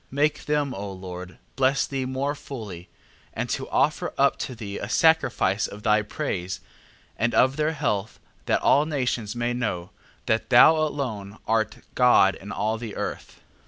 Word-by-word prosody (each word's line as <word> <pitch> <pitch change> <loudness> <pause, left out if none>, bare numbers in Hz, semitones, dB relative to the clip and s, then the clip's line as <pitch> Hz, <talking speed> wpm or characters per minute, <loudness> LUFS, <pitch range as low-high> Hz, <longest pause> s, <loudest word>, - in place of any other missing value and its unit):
Make 145 +3 0
them, 145 -3 0
O 100 -1 -5
Lord, 90 -1 -8 0.2
bless 135 +1 +2
thee 135 -2 -3
more 135 +2 -1
fully: 105 - -8 0.5
and - - -2
to - - -3
offer - - +1
up - - +4
to 130 - -4
thee 105 -3 -6
a 100 - -5
sacrifice 135 - +3
of 105 +1 -10
thy 105 0 +4
praise, 100 - -4 0.6
and 120 0 +1
of 130 +1 +4
their 155 +1 0
health, 105 -8 -2 0.3
that - - +1
all 145 +2 +4
nations 125 -7 -2
may 120 0 -1
know, 100 -7 -3 0.3
that 110 -2 0
thou 130 +6 +8
alone 125 -10 -3
art 110 -1 0
God 125 -6 +5
in 100 +4 -10
all 110 +3 -1
the 110 -3 -6
earth. - - -6
120 Hz, 160 wpm, -25 LUFS, 100-135 Hz, 0.6 s, thou